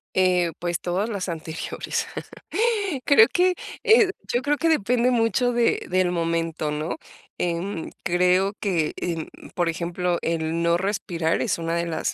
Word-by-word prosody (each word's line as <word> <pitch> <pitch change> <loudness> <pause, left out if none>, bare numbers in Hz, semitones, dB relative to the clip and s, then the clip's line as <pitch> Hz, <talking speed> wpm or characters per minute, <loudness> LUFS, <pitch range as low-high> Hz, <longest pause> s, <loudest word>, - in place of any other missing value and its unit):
Eh, 180 -2 +3
pues 175 -1 -2
todas 185 +5 -1
las 200 -4 -3
anteriores, 160 -2 -4 1.0
creo 230 -6 +7
que, 360 0 +3 0.3
eh, 445 -4 +6 0.2
yo 245 +1 0
creo 295 0 +1
que 330 - +1
depende 245 -4 +2
mucho 245 +1 +2
de 235 -1 +1
del 185 -1 +2
momento, 165 -2 -1
¿no? 150 +2 -3 0.4
Em, 175 0 -2
creo 180 +2 +2
que 170 -7 0
eh, 165 -3 -2 0.3
por 175 -1 +1
ejemplo 175 +1 -1
el 165 0 -1
no 170 0 +3
respirar 175 -4 -1
es - - 0
una 165 0 -2
de 170 0 -1
las 160 -1 -2
175 Hz, 150 wpm, -24 LUFS, 165-215 Hz, 1.0 s, creo